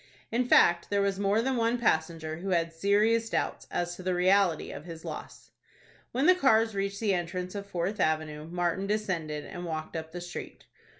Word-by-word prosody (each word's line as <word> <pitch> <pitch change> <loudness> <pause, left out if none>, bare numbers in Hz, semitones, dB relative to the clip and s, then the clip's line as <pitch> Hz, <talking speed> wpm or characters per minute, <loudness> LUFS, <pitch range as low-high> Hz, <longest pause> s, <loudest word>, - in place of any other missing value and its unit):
In 245 +1 +1
fact, 175 -7 +5
there 200 0 +2
was 200 -1 0
more 205 +3 +2
than 265 0 0
one 230 +1 +2
passenger 160 -7 0
who 190 +4 -5
had 165 -2 +1
serious 210 +6 +2
doubts - - -2
as 175 0 -2
to - - -10
the 185 0 -1
reality 185 -2 +3
of 145 - -8
his 165 -2 -9
loss. - - -8 0.6
When 265 +4 0
the 365 - +8
cars 225 -10 +3
reached 200 0 -2
the 210 -3 +1
entrance 180 +1 -3
of 200 -1 -6
Fourth 190 +3 -2
Avenue, 155 -2 0
Martin 175 +2 -1
descended, 175 -8 -2
and 175 -2 -7
walked 160 -2 -5
up 160 0 -5
the 175 - -6
street. 175 0 -8
185 Hz, 190 wpm, -29 LUFS, 165-205 Hz, 0.6 s, the